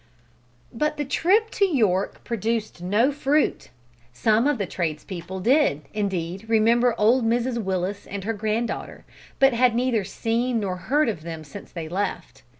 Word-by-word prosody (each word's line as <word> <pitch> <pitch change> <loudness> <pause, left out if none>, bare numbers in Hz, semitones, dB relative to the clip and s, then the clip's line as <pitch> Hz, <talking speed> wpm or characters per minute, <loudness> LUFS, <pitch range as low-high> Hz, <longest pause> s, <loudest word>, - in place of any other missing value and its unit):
But 300 +5 -1
the 295 - -2
trip 395 - +2
to 405 - 0
York 215 - 0
produced 225 -4 -2
no 210 +9 +2
fruit! 290 +1 0 0.4
Some 220 - +2
of 295 -3 +1
the 200 - -1
tradespeople 175 +2 -4
did, 240 - +3
indeed, 195 -1 -3
remember 230 +2 +3
old 235 +4 +4
Mrs 235 +1 0
Willis 190 +1 -2
and 200 -1 -5
her 225 +3 -1
granddaughter, 220 +2 -3 0.3
but 270 -1 +5
had 240 0 +3
neither 240 -3 +1
seen 230 +4 -1
nor 190 -3 -2
heard 290 +10 +1
of 205 -9 -2
them 160 -1 -7
since 155 +7 -11
they 165 -3 -6
left. 190 +5 -4
225 Hz, 150 wpm, -24 LUFS, 190-250 Hz, 0.4 s, but